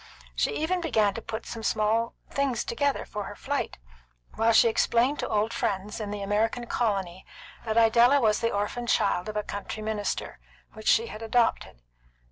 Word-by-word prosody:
She 455 - 0
even 355 +4 0
began 220 - +2
to 230 - -6
put 220 0 -6
some 230 - -6
little 220 +2 0 0.2
things 275 -4 0
together 280 +4 -1
for 210 -2 -5
her - - -8
flight, - - -3 0.6
while 225 +1 +2
she 230 - +6
explained 235 +5 +2
to - - -2
old 215 +1 0
friends 200 +2 -2
in 210 -2 -4
the 205 -1 -4
American 220 +4 0
colony 195 -7 -1 0.4
that 220 0 -1
Idella 235 +4 +5
was 215 -4 +2
the 230 - +1
orphan 210 +4 -2
child 180 -3 +1
of 210 - -4
a 210 - 0
country 205 +2 -6
minister, 215 -1 -3 0.3
which 220 0 -9
she 230 - +5
had 215 -1 -8
adopted. 225 - 0
225 Hz, 175 wpm, -27 LUFS, 210-235 Hz, 0.6 s, she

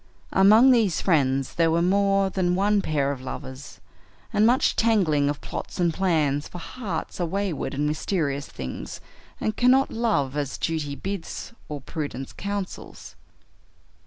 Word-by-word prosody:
Among 215 +7 +7
these 220 -9 +3
friends 135 -6 +1
there 165 -1 +2
were 165 +1 +2
more 195 +1 +2
than 180 -2 +1
one 200 +2 +2
pair 145 -5 0
of 135 -2 -6
lovers, 130 +1 -8 0.5
and 210 +1 +4
much 250 +2 +3
tangling 175 -11 +3
of 145 - -3
plots - - -6
and 170 -2 +2
plans, 155 -6 +1
for - - -9
hearts 180 -2 -5
are - - +2
wayward 190 -5 -2
and 145 +2 0
mysterious 150 -2 -1
things, 65 -1 -7 0.4
and 215 - -1
cannot 255 +3 +4
love 210 - 0
as 145 -2 -2
duty 155 -3 -2
bids 195 +5 -5 0.2
or 145 -2 -5
prudence 135 -2 -5
counsels. 200 -1 -6
170 Hz, 145 wpm, -25 LUFS, 145-200 Hz, 0.5 s, Among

